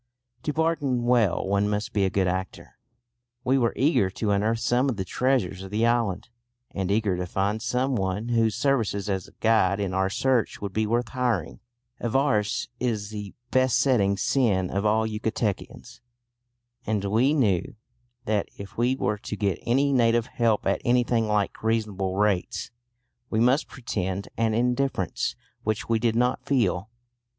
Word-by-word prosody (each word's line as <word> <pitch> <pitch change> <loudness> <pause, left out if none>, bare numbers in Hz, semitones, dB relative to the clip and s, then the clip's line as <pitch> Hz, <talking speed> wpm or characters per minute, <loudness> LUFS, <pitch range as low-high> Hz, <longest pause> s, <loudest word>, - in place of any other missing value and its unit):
To 150 - -2
bargain 150 -6 0
well 120 -8 +2
one 100 +1 +1
must 105 +1 -2
be 100 -2 +2
a - - +1
good 95 0 +1
actor. 95 +1 -4 0.6
We 135 +1 +2
were 115 -2 +2
eager 135 - +2
to 105 +2 -2
unearth 105 +3 +1
some 125 +4 +1
of 120 - -2
the 95 - -2
treasures 110 -4 0
of 95 - -8
the 110 +3 +1
island, 115 -4 0 0.4
and 95 -2 -3
eager 105 -2 +1
to 90 0 -3
find 100 +4 -1
some 130 +3 0
one 100 +2 -2
whose 115 -3 +2
services 115 -6 0
as 95 -1 -3
guide 110 -3 +3
in 100 -2 -2
our 95 0 +1
search 125 +3 0
would 100 -2 -5
be 110 +1 0
worth 120 +2 0
hiring. 120 -10 -1 0.4
Avarice 120 -3 +1
is 110 -4 -2
the 105 -2 -7 0.2
besetting 125 -5 +3
sin 100 -6 +1
of 100 +2 0
all 110 +1 +2
Yucatecans, 110 -1 -3 0.8
and 105 -4 -1
we 120 +9 +2
knew 105 - +1 0.5
that 105 -2 0
if 100 +2 -9
we 125 +2 +2
were 105 -5 -1
to 105 - -5
get 100 -3 -1
any 140 +4 +3
native 115 -2 +3
help 115 -3 0
at 100 - +1
anything 120 -2 +2
like 105 -2 0
reasonable 105 -4 -1
rates 105 -1 0 0.6
we 110 - 0
must 125 +6 +3
pretend 100 -6 -4
an 115 -1 +1
indifference 125 -5 0 0.3
which 110 0 -2
we 115 -1 +2
did 115 -1 +1
not 125 +1 +1
feel. 105 -7 0
110 Hz, 160 wpm, -26 LUFS, 100-120 Hz, 0.8 s, guide